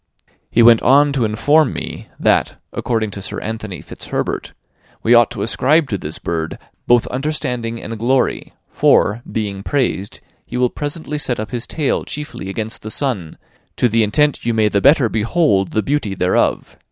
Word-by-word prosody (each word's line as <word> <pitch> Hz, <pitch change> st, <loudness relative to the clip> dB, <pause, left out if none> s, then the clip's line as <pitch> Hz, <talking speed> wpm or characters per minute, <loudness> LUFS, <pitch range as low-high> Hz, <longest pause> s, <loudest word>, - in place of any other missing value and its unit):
He 115 Hz, -, +4 dB
went 115 Hz, -1 st, +7 dB
on 140 Hz, +3 st, +4 dB
to 130 Hz, -5 st, +1 dB
inform 145 Hz, +7 st, +3 dB
me, -, -, -6 dB
that, -, -, +2 dB, 0.2 s
according 110 Hz, -3 st, -1 dB
to 100 Hz, -, -7 dB
Sir 95 Hz, -, -5 dB
Anthony 110 Hz, -4 st, -6 dB
Fitzherbert, -, -, -4 dB, 0.5 s
we 115 Hz, -, +4 dB
ought 120 Hz, -1 st, +6 dB
to 110 Hz, -5 st, -4 dB
ascribe, 145 Hz, +7 st, +2 dB
to 100 Hz, -, -1 dB
this 75 Hz, 0 st, -5 dB
bird 80 Hz, -1 st, -3 dB, 0.3 s
"both 120 Hz, -1 st, +4 dB
understanding 125 Hz, -4 st, -3 dB
and 115 Hz, -1 st, -7 dB
glory; 130 Hz, +3 st, 0 dB, 0.2 s
for, 105 Hz, +3 st, +3 dB
being 100 Hz, -3 st, -3 dB
praised, 110 Hz, -5 st, -1 dB, 0.2 s
he -, -, -6 dB
will 125 Hz, -1 st, +2 dB
presently 150 Hz, 0 st, -4 dB
set 125 Hz, -5 st, -1 dB
up 110 Hz, -, -5 dB
his 120 Hz, -2 st, -3 dB
tail 150 Hz, -4 st, -1 dB
chiefly 150 Hz, -9 st, -6 dB
against 110 Hz, +2 st, -4 dB
the 110 Hz, -, -7 dB
sun, 110 Hz, -, -2 dB, 0.4 s
to -, -, +2 dB
the 115 Hz, 0 st, +2 dB
intent 145 Hz, +7 st, +2 dB
you 115 Hz, -1 st, 0 dB
may 110 Hz, -1 st, +3 dB
the 100 Hz, -1 st, +1 dB
better 140 Hz, -3 st, +5 dB
behold 110 Hz, -, +1 dB
the 110 Hz, -, -1 dB
beauty 135 Hz, -9 st, -1 dB
thereof. 90 Hz, 0 st, 0 dB
115 Hz, 170 wpm, -18 LUFS, 105-135 Hz, 0.5 s, went